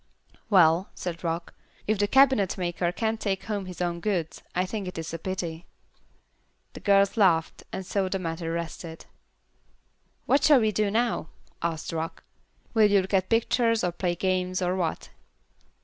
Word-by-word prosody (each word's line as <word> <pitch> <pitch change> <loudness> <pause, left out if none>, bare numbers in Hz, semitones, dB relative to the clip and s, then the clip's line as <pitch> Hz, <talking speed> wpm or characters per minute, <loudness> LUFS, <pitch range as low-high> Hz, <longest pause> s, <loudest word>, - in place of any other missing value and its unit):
"Well," 180 -1 +5
said 170 -1 -5
Rock, 165 0 -3 0.3
"if 215 -1 0
the 205 - +3
cabinetmaker 195 -10 +3
can't 220 +4 -1
take 195 -3 -2
home 205 -3 -3
his 180 -1 -7
own 170 -1 -2
goods, 175 -4 -2
I 180 +1 +1
think 200 0 -4
it 180 - -6
is 165 0 -5
a 165 - -4
pity." 170 -2 -4 1.1
The - - -9
girls 200 +1 +3
laughed, 170 -6 +3
and 190 - -5
so 190 0 -1
the 195 - -1
matter 165 -2 -4
rested. 165 0 -6 1.2
"What 280 - +3
shall 295 -4 +7
we 220 -2 +2
do 210 0 +1
now?" 230 -4 0 0.3
asked 165 -1 -3
Rock. 165 0 -4 0.5
"Will 215 -2 +5
you 200 -1 +4
look 190 - -8
at 190 -1 +2
pictures, 230 0 +2
or 180 - +1
play 175 0 -1
games, 185 0 0
or 180 0 0
what?" 170 -4 -2
185 Hz, 165 wpm, -27 LUFS, 170-205 Hz, 1.2 s, shall